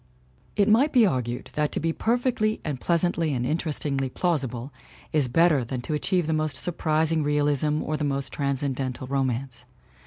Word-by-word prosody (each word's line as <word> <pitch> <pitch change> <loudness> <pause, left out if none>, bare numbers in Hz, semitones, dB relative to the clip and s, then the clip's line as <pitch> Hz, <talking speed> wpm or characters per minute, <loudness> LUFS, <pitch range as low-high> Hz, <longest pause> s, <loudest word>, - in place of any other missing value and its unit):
It 200 0 +3
might 245 +8 +4
be 245 -4 +6
argued 125 - -2
that 150 -1 0
to - - -1
be 165 +1 0
perfectly 230 -1 0
and 145 -5 -3
pleas 170 -1 +2
antly 165 -4 +1
and 125 -1 -1
interestingly 145 -3 -1
plausible 135 -5 -2 0.4
is 150 -4 +2
better 155 +1 +4
than 125 +1 -4
to 155 - -3
achieve 175 +3 +1
the 160 - 0
most 155 -2 -1
surprising 160 +1 0
realism 150 0 +1
or 155 - -2
the 150 - -3
most 140 -1 -2
trans 140 -1 -1
cendental 130 -2 -3
romance. 130 -2 -2
150 Hz, 175 wpm, -25 LUFS, 135-165 Hz, 0.4 s, be